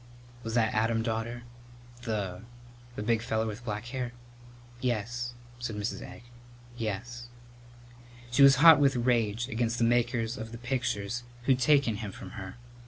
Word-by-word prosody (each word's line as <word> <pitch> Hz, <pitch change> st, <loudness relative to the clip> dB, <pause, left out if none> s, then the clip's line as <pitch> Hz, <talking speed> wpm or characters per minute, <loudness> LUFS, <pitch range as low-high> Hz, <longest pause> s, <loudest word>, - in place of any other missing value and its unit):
"Was 115 Hz, -1 st, -4 dB
that 110 Hz, -2 st, +2 dB
Adam, 115 Hz, +1 st, +1 dB
daughter? 115 Hz, +1 st, -3 dB, 0.6 s
The 105 Hz, -5 st, -3 dB, 0.5 s
the 105 Hz, -, -4 dB
big 115 Hz, 0 st, +2 dB
feller 110 Hz, 0 st, -1 dB
with 110 Hz, +2 st, -5 dB
black 105 Hz, -1 st, -4 dB
hair?" 120 Hz, -1 st, -4 dB, 0.7 s
"Yes," 120 Hz, 0 st, -2 dB, 0.2 s
said 120 Hz, -3 st, -4 dB
Mrs. 105 Hz, +2 st, -3 dB
Egg; -, -, -10 dB, 0.5 s
"yes." 120 Hz, +2 st, -4 dB, 1.0 s
She 125 Hz, -, +3 dB
was 140 Hz, 0 st, +9 dB
hot 155 Hz, +2 st, +9 dB
with 140 Hz, -2 st, +4 dB
rage 120 Hz, -2 st, +1 dB
against 115 Hz, -2 st, -1 dB
the 120 Hz, -, +1 dB
makers 120 Hz, 0 st, +1 dB
of 115 Hz, +1 st, -7 dB
pictures 120 Hz, -4 st, -1 dB, 0.2 s
who'd 130 Hz, 0 st, +3 dB
taken 130 Hz, -4 st, +3 dB
him 105 Hz, -2 st, -5 dB
from 95 Hz, -1 st, -10 dB
her. 95 Hz, -2 st, -8 dB
115 Hz, 145 wpm, -29 LUFS, 110-120 Hz, 1.0 s, was